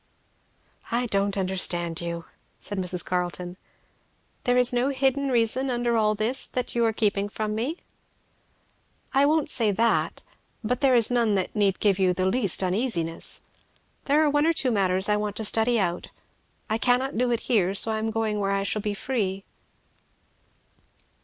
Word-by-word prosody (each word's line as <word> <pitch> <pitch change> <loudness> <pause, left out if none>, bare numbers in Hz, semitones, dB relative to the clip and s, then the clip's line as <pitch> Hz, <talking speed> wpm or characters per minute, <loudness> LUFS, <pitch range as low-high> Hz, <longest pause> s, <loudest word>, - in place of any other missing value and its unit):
"I 240 +2 0
don't 200 -2 -1
understand 175 -3 0
you," 170 0 -5 0.4
said 205 - -6
Mrs. 180 -1 +1
Carleton 180 0 -3 0.9
"There 245 0 +2
is 250 0 +3
no 245 +2 +1
hidden 275 0 0
reason 245 +2 +2
under 240 -1 0
all 215 -1 +2
this 225 +5 0
that 250 -1 -4
you 235 - +1
are 225 - +2
keeping 205 -2 -1
from 215 0 -3
me?" 250 +10 -3 1.4
"I 275 +1 +4
won't 310 0 +1
say 225 -4 +3
that. 225 +3 0 0.4
But 250 +5 -2
there 265 -3 +4
is 235 0 +5
none 230 -4 +2
that 190 +2 -2
need 200 -3 +1
give 200 -2 +2
you 185 -1 +2
the 185 +1 -1
least 195 -2 0
uneasiness. 180 -4 0 0.6
There 295 +2 +3
are 300 - +2
one 290 +2 +2
or 330 - +3
two 270 -5 +1
matters 190 -2 +2
I 210 0 +2
want 210 -1 -3
to 220 - -2
study 225 +2 +2
out 175 -3 -2 0.6
I 220 0 -1
cannot 250 +3 +1
do 245 +2 +1
it 235 -1 -1
here, 195 -6 +1
so 220 +2 +3
I 220 - -1
am 220 +1 -2
going 220 -1 -2
where 195 -1 -1
I 195 0 0
shall 205 +2 -1
be 205 0 -3
free." 195 -5 -3
220 Hz, 170 wpm, -25 LUFS, 195-245 Hz, 1.4 s, is